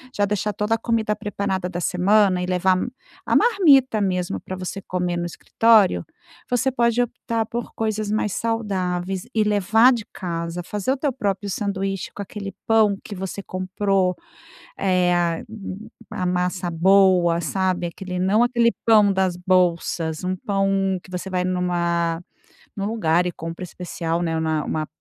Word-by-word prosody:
já 205 - +1
deixar 210 +1 0
toda 210 +3 0
a - - -2
comida 225 -2 0
preparada 190 -3 -3
da 175 -1 -5
semana 185 +1 +3
e - - -1
levar 185 0 +2 0.5
a - - +1
marmita 285 - +5
mesmo 180 -3 -1
para 185 - -7
você 185 +1 -5
comer 180 -2 -2
no 175 - -2
escritório, 215 +3 +3 0.4
você 250 +2 +1
pode 235 -1 +2
optar 230 -1 -2
por 235 +1 -5
coisas 215 -1 -2
mais 210 -2 0
saudáveis 190 -5 -2
e 220 - +3
levar 210 +4 +4
de 230 -4 -2
casa, 170 -1 -4
fazer 205 +6 -2
o 275 - 0
teu 280 +1 0
próprio 205 -4 -2
sanduíche 195 -1 -3
com - - -5
aquele 200 -1 -7
pão 220 -2 +4
que 205 - -7
você 190 +1 -5
comprou, 185 0 0 0.6
é 180 -2 +2
a 170 -1 0
hum, 215 -1 -8 0.2
a 185 - -3
massa 180 0 -1
boa, 180 -1 +4
sabe, 185 -1 -1
aquele 180 +1 -6
não 200 +5 +3
aquele 235 -1 +2
pão 210 -3 +5
das 190 -2 0
bolsas, 175 -3 0
um 185 +1 0
pão 195 0 0
que 195 - -17
você 185 +1 -5
vai 180 -1 -1
numa 170 -2 0 0.5
num 200 0 -3
lugar 180 -6 +1
e 180 - -2
compra 165 +2 -7
especial, 170 -1 -3
né, 165 -1 -1
na 160 -1 0
uma 155 -1 -2
190 Hz, 160 wpm, -22 LUFS, 180-210 Hz, 0.6 s, marmita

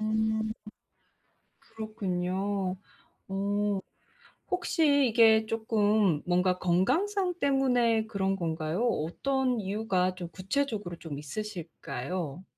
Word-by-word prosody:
음. 220 0 0 1.1
그렇군요. 195 -3 -2 0.5
어 200 +1 -1 0.9
혹시 315 -6 +3
이게 220 -1 +5
쪼끔 215 -6 +2
뭔가 180 +1 +2
건강상 350 - +1
때문에 245 -6 +2
그런 195 -3 0
건가요? 165 +4 -1
어떤 250 - 0
이유가 195 -2 0
좀 180 -2 -6
구체적으로 200 - -2
좀 150 -4 -6
있으실까요? 175 -1 -5
210 Hz, 200 characters per minute, -29 LUFS, 180-230 Hz, 1.1 s, 이게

